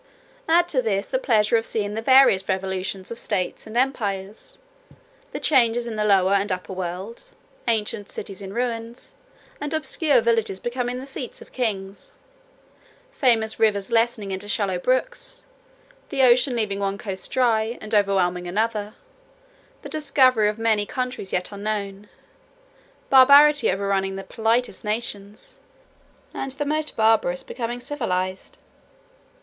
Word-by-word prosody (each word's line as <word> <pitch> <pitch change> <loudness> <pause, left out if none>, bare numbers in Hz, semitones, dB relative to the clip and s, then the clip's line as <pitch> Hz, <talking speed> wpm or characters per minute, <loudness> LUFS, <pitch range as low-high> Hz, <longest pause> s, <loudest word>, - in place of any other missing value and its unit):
"Add 345 +2 +4
to 260 - +2
this, 200 -4 -1
the - - 0
pleasure 220 - +3
of 225 - -1
seeing 205 -2 -2
the 220 - -3
various 260 -7 +5
revolutions 190 0 -3
of 235 - -4
states 190 +1 -2
and 220 +2 -5
empires; 215 - -2 0.7
the - - -5
changes 240 -4 +3
in 230 -2 -5
the 215 - -1
lower 195 -2 +3
and 200 +1 +1
upper 185 0 -4
world; 185 - -6 0.4
ancient 210 -2 -1
cities 195 -1 -7
in 195 -1 -7
ruins, 235 +1 -4 0.5
and 295 +2 -2
obscure 305 -3 +2
villages 225 -4 0
become 245 +2 -3
the 250 +2 -4
seats 265 -2 -6
of - - -15
kings; 210 - -4 1.0
famous 230 - +1
rivers 205 -3 +1
lessening 225 -3 +1
into 190 +2 -5
shallow 200 -4 -1
brooks; - - -2 0.6
the 270 -1 +1
ocean 250 +1 +4
leaving 210 -4 -1
one 200 0 -2
coast 195 -2 -6
dry, 230 -2 +1
and 215 +1 -9
overwhelming 185 -4 +1
another; 215 +2 -2 0.9
the - - -8
discovery 260 -7 +3
of 210 - -4
many 220 -2 +1
countries 250 -6 -4
yet 180 +2 -2
unknown; 205 -1 -4 1.0
barbarity 280 +2 +7
overrunning 195 -1 -1
the 195 - -6
politest 230 +5 -1
nations, 210 -2 -4 0.7
and 270 -1 -4
the 290 +2 -3
most 305 +1 -2
barbarous 220 -5 +2
become 240 0 -5
civilized. 190 -9 -3
220 Hz, 135 wpm, -23 LUFS, 195-250 Hz, 1.0 s, barbarity